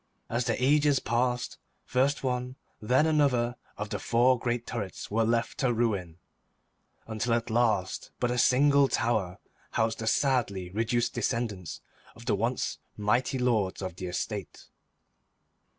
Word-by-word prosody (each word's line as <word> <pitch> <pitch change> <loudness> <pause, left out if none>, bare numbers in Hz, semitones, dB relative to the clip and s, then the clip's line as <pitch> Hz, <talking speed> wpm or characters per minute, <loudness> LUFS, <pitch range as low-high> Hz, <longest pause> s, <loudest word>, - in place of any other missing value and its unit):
As 120 +1 0
the 120 -2 0
ages 145 +1 +4
passed, 125 +1 -1 0.3
first 135 +4 +1
one, 125 0 -2 0.3
then 125 +7 +3
another 135 -6 +2 0.2
of 105 0 -4
the 105 - -2
four 120 +4 +3
great 120 0 -2
turrets 105 -6 -5
were 115 +2 +2
left 115 +1 0
to 130 -2 +2
ruin, 100 -8 -1 0.9
until 115 +1 0
at 115 0 -2
last 110 -5 +1
but 125 -1 +1
a 125 - 0
single 140 +3 +5
tower 110 -8 0 0.4
housed 110 0 0
the 110 - -4
sadly 110 -8 +1
reduced 115 +3 0
descendants 110 -7 -2 0.3
of 115 - -13
the 120 - +1
once 115 +5 -1 0.2
mighty 120 +6 +1
lords 115 -7 +1
of 95 -2 -4
the 95 -2 -5
estate. 95 +2 -5
120 Hz, 140 wpm, -28 LUFS, 105-125 Hz, 0.9 s, single